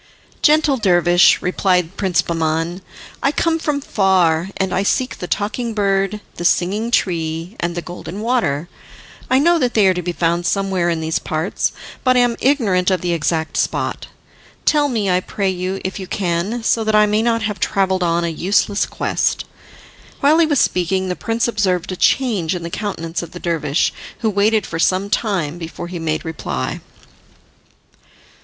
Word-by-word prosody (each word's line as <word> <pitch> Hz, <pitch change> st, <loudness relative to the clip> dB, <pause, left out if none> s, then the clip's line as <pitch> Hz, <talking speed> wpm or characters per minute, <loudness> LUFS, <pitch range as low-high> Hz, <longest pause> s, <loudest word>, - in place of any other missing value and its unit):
"Gentle 300 Hz, -2 st, +4 dB
dervish," 175 Hz, -4 st, +4 dB
replied 180 Hz, -1 st, +1 dB
Prince 185 Hz, -4 st, +1 dB
Bahman, 165 Hz, +2 st, -1 dB, 0.4 s
"I 275 Hz, -, +2 dB
come 330 Hz, +1 st, +1 dB
from 295 Hz, -3 st, -1 dB
far, 185 Hz, -, +2 dB
and 190 Hz, -1 st, -1 dB
I -, -, +1 dB
seek 255 Hz, +6 st, 0 dB
the 180 Hz, -, -5 dB
Talking 220 Hz, +4 st, -2 dB
Bird, 195 Hz, 0 st, 0 dB, 0.2 s
the 175 Hz, -, -4 dB
Singing 195 Hz, +6 st, +1 dB
Tree, 165 Hz, -3 st, -1 dB
and 170 Hz, 0 st, -2 dB
the 175 Hz, -, -4 dB
Golden 175 Hz, +2 st, -7 dB
Water. 175 Hz, -, 0 dB, 0.6 s
I 260 Hz, -, +4 dB
know 335 Hz, +5 st, +4 dB
that 250 Hz, -4 st, 0 dB
they 215 Hz, -3 st, +5 dB
are 190 Hz, -, +5 dB
to 180 Hz, -, -3 dB
be 175 Hz, 0 st, -2 dB
found 170 Hz, +1 st, 0 dB
somewhere 190 Hz, -3 st, 0 dB
in 165 Hz, -1 st, -1 dB
these 160 Hz, 0 st, -1 dB
parts, 160 Hz, +4 st, -2 dB, 0.3 s
but 255 Hz, -1 st, +3 dB
I -, -, +6 dB
am 240 Hz, -1 st, +2 dB
ignorant 210 Hz, -10 st, +2 dB
of 185 Hz, -1 st, +1 dB
the 175 Hz, -1 st, 0 dB
exact 160 Hz, 0 st, -1 dB
spot. -, -, -1 dB, 0.6 s
Tell 295 Hz, -2 st, +3 dB
me, 220 Hz, -6 st, -1 dB
I 180 Hz, -1 st, +3 dB
pray 195 Hz, +1 st, -2 dB
you, 185 Hz, +1 st, -3 dB
if 190 Hz, +2 st, -3 dB
you 190 Hz, -, -6 dB
can, 190 Hz, +6 st, -2 dB
so 225 Hz, 0 st, +2 dB
that 220 Hz, 0 st, +1 dB
I 210 Hz, 0 st, +6 dB
may 210 Hz, +1 st, +1 dB
not 230 Hz, -1 st, +1 dB
have 210 Hz, -3 st, -3 dB
travelled 190 Hz, 0 st, +1 dB
on 170 Hz, 0 st, +1 dB
a -, -, 0 dB
useless 200 Hz, +5 st, +1 dB
quest." -, -, -1 dB, 0.7 s
While 300 Hz, +4 st, +4 dB
he 330 Hz, -, +4 dB
was 290 Hz, -4 st, +2 dB
speaking, 185 Hz, +1 st, +1 dB
the 180 Hz, -, -1 dB
prince 230 Hz, +4 st, -1 dB
observed 190 Hz, -6 st, 0 dB
a -, -, -3 dB
change 195 Hz, -6 st, +1 dB
in 175 Hz, -, -5 dB
the 170 Hz, -, -6 dB
countenance 170 Hz, -6 st, -3 dB
of 170 Hz, -, -9 dB
the 175 Hz, -, -7 dB
dervish, 160 Hz, -3 st, 0 dB, 0.3 s
who 220 Hz, -2 st, +1 dB
waited 210 Hz, +1 st, +2 dB
for 165 Hz, -, -5 dB
some 190 Hz, +4 st, +1 dB
time 175 Hz, -7 st, -1 dB
before 170 Hz, +1 st, -7 dB
he 175 Hz, -1 st, -5 dB
made 160 Hz, +1 st, -2 dB
reply. 75 Hz, -, -4 dB
190 Hz, 180 wpm, -19 LUFS, 170-220 Hz, 0.7 s, I